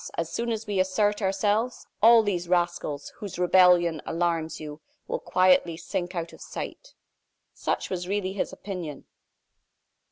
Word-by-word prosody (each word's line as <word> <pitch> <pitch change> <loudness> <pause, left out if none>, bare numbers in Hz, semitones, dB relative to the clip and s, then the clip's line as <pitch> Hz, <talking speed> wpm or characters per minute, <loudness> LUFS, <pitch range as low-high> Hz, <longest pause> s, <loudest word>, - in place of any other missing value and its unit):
As 165 -1 -2
soon 235 0 -1
as 225 0 -3
we 205 -3 -1
assert 205 +3 +1
ourselves, 205 +5 0 0.2
all 230 +1 +8
these 180 -4 -2
rascals, 175 -5 0
whose 205 -6 -7
rebellion 180 -3 +4
alarms 165 -1 -1
you, 150 0 -8 0.3
will - - -2
quietly 185 -2 +3
sink 180 +1 -4
out 170 -1 -4
of - - -14
sight." - - -7 0.6
Such - - -2
was 180 -1 -3
really 190 -1 -1
his 200 - -2
opinion. 175 -8 -7
185 Hz, 140 wpm, -26 LUFS, 170-205 Hz, 0.6 s, all